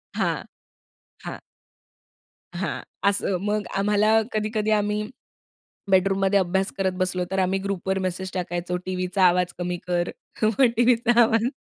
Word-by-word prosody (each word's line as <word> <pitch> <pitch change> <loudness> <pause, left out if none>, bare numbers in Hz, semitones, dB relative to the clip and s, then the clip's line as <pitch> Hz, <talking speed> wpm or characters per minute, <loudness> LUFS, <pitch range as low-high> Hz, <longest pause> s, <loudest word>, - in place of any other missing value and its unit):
हां, - - 0 0.8
हां. - - -6 1.2
हां, - - -3 0.3
असं. 195 -2 0
मग 210 -1 -1
आम्हाला 210 +2 +3
कधी-कधी 215 0 -1
आम्ही 210 0 +1 0.9
बेडरूममध्ये 195 +1 +3
अभ्यास 190 +1 0
करत 190 -1 +1
बसलो, 185 -1 0
तर 195 - 0
आम्ही 190 +1 +1
ग्रुपवर 195 -1 -2
मेसेज 185 +1 -3
टाकायचो, 180 -1 -2
टीव्हीचा 185 +1 -1
आवाज 180 0 +1
कमी 175 0 -2
कर 175 0 0 0.3
मग 220 +4 +3
टीव्हीचा 240 0 +3
आवाज 225 0 +3
195 Hz, 125 wpm, -24 LUFS, 180-210 Hz, 1.2 s, आम्हाला